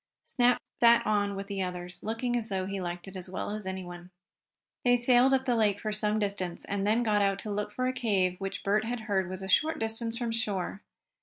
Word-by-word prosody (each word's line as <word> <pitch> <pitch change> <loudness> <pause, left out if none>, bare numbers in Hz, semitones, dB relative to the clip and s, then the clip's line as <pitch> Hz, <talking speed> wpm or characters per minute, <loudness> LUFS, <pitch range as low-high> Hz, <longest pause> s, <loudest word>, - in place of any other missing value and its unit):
Snap 245 0 +3 0.2
sat 235 0 +6
on 205 -1 +1
with 195 0 -4
the 200 -1 -3
others, 180 -1 -4
looking 230 +3 -1
as 230 -2 -1
though 190 -1 -1
he 195 0 -3
liked 175 +1 -5
it 195 - -10
as 185 0 -7
well 185 - -4
as 210 -2 -5
anyone. 180 -2 -6 0.7
They 245 0 +5
sailed 245 +2 +4
up 265 -1 +2
the 245 - +2
lake 210 -3 +2
for 215 -1 -3
some 210 0 0
distance 200 -4 -3
and 200 0 -1
then 225 +3 +3
got 210 -2 +2
out 195 -1 +2
to 215 - -5
look 210 0 -2
for 255 +5 -2
a 255 - +1
cave 195 -7 0
which 195 +1 -4
Bert 210 +2 +2
had 235 +1 -3
heard 195 -5 0
was 185 +1 -6
a - - -4
short 310 +11 +3
distance 225 +1 -2
from 235 -2 -2
shore. 205 -4 -2
205 Hz, 230 wpm, -29 LUFS, 190-230 Hz, 0.7 s, sat